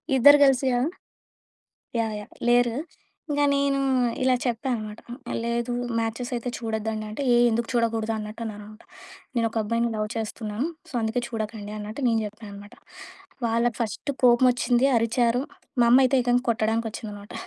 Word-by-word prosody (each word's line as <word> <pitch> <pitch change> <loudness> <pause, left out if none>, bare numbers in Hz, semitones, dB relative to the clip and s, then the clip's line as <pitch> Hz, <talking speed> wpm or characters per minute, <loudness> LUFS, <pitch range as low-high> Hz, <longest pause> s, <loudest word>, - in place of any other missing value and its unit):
ఇద్దరు 285 +3 +8
కలిసియా? 260 -2 +2 1.2
Yeah! 220 -1 -1
Yeah! 210 - -11 0.2
లేరు. 240 -1 +4 0.5
ఇంకా 290 0 +1
నేను 280 0 +1 0.5
ఇలా 255 -1 +4
చెప్పా 240 +2 -2
అనమాట. 215 -1 -7 0.4
"లేదు, 235 +1 -1 0.3
మ్యాచెస్ 230 +3 -3
అయితే 240 +1 -3
చూడొద్దండి." 220 -1 -3
అంటే 215 +7 -5
"ఏ - - +5
ఎందుకు 230 +1 -1
చూడకూడదు?" 225 -1 0
అన్నట్టు 215 +2 -7
అన్నమాట. 215 0 -9 0.5
"నేను 230 -1 +2
ఒక 230 - -4
అబ్బాయిని 230 +2 0
లవ్ 215 0 -1
చేస్తున్నాను, 220 +4 -3 0.2
సో - - -15
అందుకే 225 +3 -1
చూడకండి." 215 -2 -5
అన్నట్టు 215 +6 -6
నేను 225 -1 +2
జెప్పా 215 +1 -9
అనమాట. 205 +3 -11 0.7
వాళ్ళ 230 +1 +1
ఫస్ట్ 235 +5 -2
కోపం 245 +1 +6
ఒచ్చింది, 245 +1 +2
అరిచారు. 235 +2 +2 0.4
మా - - +6
అమ్మ 255 - +8
అయితే 270 +1 +2
ఏకంగా 245 0 +2
కొట్టడానికి 225 0 +1
ఒచ్చిందనమాట. 205 -2 -8
230 Hz, 150 wpm, -25 LUFS, 215-245 Hz, 1.2 s, ఇద్దరు